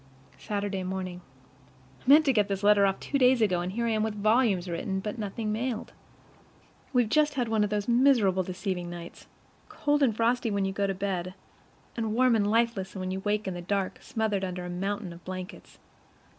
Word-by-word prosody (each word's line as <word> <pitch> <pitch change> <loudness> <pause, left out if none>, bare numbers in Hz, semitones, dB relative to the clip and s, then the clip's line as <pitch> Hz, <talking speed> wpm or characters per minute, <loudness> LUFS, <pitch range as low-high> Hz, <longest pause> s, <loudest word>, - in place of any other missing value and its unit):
Saturday 200 -2 -3
morning. 185 -1 -4 0.8
I - - -6
meant 305 +2 +8
to 270 - +3
get 210 -3 +2
this 200 0 -3
letter 205 -1 +5
off 195 - -1
two 280 - -2
days 255 -1 +5
ago; 185 -6 +2
and 180 +1 -3
here 235 +4 -2
I 230 - +1
am 215 -1 +1
with 220 -1 -1
volumes 215 -3 +2
written, 185 +3 -2
but 210 +4 -5
nothing 215 +1 -3
mailed. 230 +1 -3 1.0
We've 245 -3 +3
just 300 +4 +2
had 250 -3 0
one 220 -1 +2
of 210 - 0
those 210 0 -2
miserable 235 -7 +4
deceiving 180 -1 -4
nights 175 -1 -9 0.4
cold 295 0 0
and 230 -6 +2
frosty 235 +1 +1
when 200 -2 0
you 195 - -1
go 200 0 0
to 195 - -2
bed, 185 -1 -3 0.6
and 225 -2 -2
warm 250 -1 +4
and 205 -2 +1
lifeless 225 -4 0
when 185 -1 -3
you 190 - -3
wake 210 +1 -1
in 190 - -2
the 175 - -6
dark, 195 +1 -2
smothered 215 -3 -1
under 180 -1 -4
a 180 - -5
mountain 195 +1 -3
of 170 +1 -14
blankets. 185 0 -8
205 Hz, 200 wpm, -28 LUFS, 190-230 Hz, 1.0 s, meant